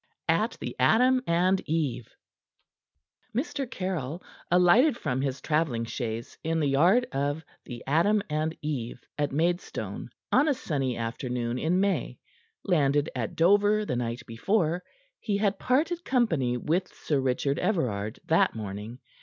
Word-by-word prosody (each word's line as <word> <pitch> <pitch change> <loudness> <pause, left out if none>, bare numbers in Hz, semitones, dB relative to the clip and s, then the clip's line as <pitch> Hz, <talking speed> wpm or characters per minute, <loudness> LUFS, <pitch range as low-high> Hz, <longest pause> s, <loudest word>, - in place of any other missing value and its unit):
AT - - +2
THE - - -5
"ADAM 255 +3 +4
AND 180 +3 +2
EVE" 145 -8 -1 1.3
Mr. 270 0 -2
Caryll, 180 - -4 0.3
alighted 200 - +5
from 130 - -2
his 135 -1 -2
traveling 150 -7 0
chaise 115 -1 -5
in 165 0 0
the 150 - +1
yard 175 - +4
of 145 +3 -2 0.2
the 120 -1 -8
"Adam 185 +9 +3
and 155 +1 -2
Eve," 125 -6 -3 0.2
at 145 -1 0
Maidstone, 170 +5 -2 0.2
on 300 - +4
a 290 - +3
sunny 135 - -2
afternoon 120 +1 -3
in 170 +6 +1
May. 200 0 0 0.5
Landed 145 -5 +2
at 115 -4 -3
Dover 205 +5 +4
the 125 - -2
night 120 0 -3
before, 170 - 0 0.4
he 205 -3 -1
had 200 -1 0
parted 325 +7 +1
company 165 - +1
with 175 +8 0
Sir 145 -3 -1
Richard 135 +2 0
Everard 110 - -1
that 170 0 +3
morning. 105 +2 -6
155 Hz, 135 wpm, -27 LUFS, 125-195 Hz, 1.3 s, alighted